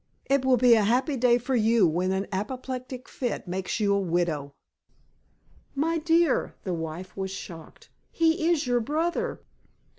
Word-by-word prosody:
It 275 -1 +2
will 260 -1 +4
be 245 0 +6
a 220 -2 +4
happy 255 +7 +1
day 245 -1 +4
for 255 +2 -2
you 225 -2 +4
when 180 +4 0
an 190 +1 -1
apoplectic 255 +5 -5
fit 245 -6 -4
makes 185 +4 -3
you 205 -2 +2
a 200 - +2
widow." 165 -6 -1 1.2
"My 325 +4 0
dear," 330 +1 +2
the 185 - -2
wife 165 +2 -6
was 190 -1 -3
shocked, 170 -4 -10 0.2
"he 325 0 +2
is 325 -4 +1
your 245 -1 +2
brother." 315 +8 -2
235 Hz, 155 wpm, -26 LUFS, 190-270 Hz, 1.2 s, be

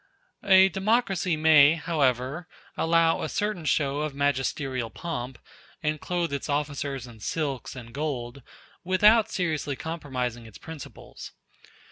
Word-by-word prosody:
A 190 -1 +7
democracy 195 -4 +1
may, 155 -1 +6
however, 145 -1 -1 0.3
allow 165 0 +2
a - - -3
certain 205 -5 -2
show 140 -1 +1
of 150 -2 -3
magisterial 135 -3 -1
pomp, 130 -6 -5 0.5
and 150 0 -1
clothe 175 -4 -2
its 140 +2 -4
officers 145 -2 -2
in 120 -3 -13
silks 135 +1 -3
and 115 -2 -10
gold, 140 -3 -4 0.4
without 210 +5 +4
seriously 155 -6 -2
compromising 130 -7 -4
its 110 - -13
principles. 160 -3 -10
150 Hz, 120 wpm, -26 LUFS, 130-170 Hz, 0.5 s, A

